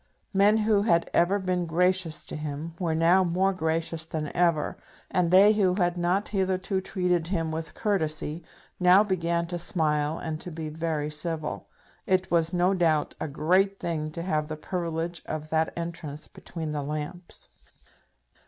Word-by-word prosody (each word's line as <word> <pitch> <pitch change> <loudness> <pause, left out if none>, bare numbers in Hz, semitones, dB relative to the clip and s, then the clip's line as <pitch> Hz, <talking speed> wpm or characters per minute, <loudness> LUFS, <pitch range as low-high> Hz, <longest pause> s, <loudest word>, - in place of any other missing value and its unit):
Men 200 +2 +5
who 215 -2 +4
had 170 -5 +2
ever 175 +4 +3
been 185 -3 -1
gracious 180 -1 +1
to - - -6
him 150 +2 -5
were 165 -3 0
now 170 +4 +4
more 185 +2 +1
gracious 160 -1 0
than 155 -2 -4
ever, 170 -3 +2 0.4
and 180 -2 +2
they 195 +4 +7
who 190 -4 +2
had 175 -2 +1
not 180 +3 0
hitherto 190 -1 0
treated 180 -3 0
him 165 -3 -1
with 160 0 -5
courtesy, 160 -6 -1 0.4
now 180 +3 +6
began 170 -4 0
to 175 +1 -4
smile 155 -2 0
and 155 0 -5
to - - -6
be 160 -2 -5
very 155 -1 -2
civil. 155 0 -4 0.4
It 185 -1 +1
was, 165 -1 +2
no 180 +1 +2
doubt, 165 -5 +1
a - - -2
great 185 +7 +1
thing 155 -2 -2
to 170 - -4
have 155 -4 -1
the 155 0 -5
privilege 170 0 -3
of 155 0 -5
that 160 0 +1
entrance 165 -3 -6
between 160 -3 -7
the 150 -1 -2
lamps. 150 +5 -6
170 Hz, 160 wpm, -27 LUFS, 160-185 Hz, 0.4 s, they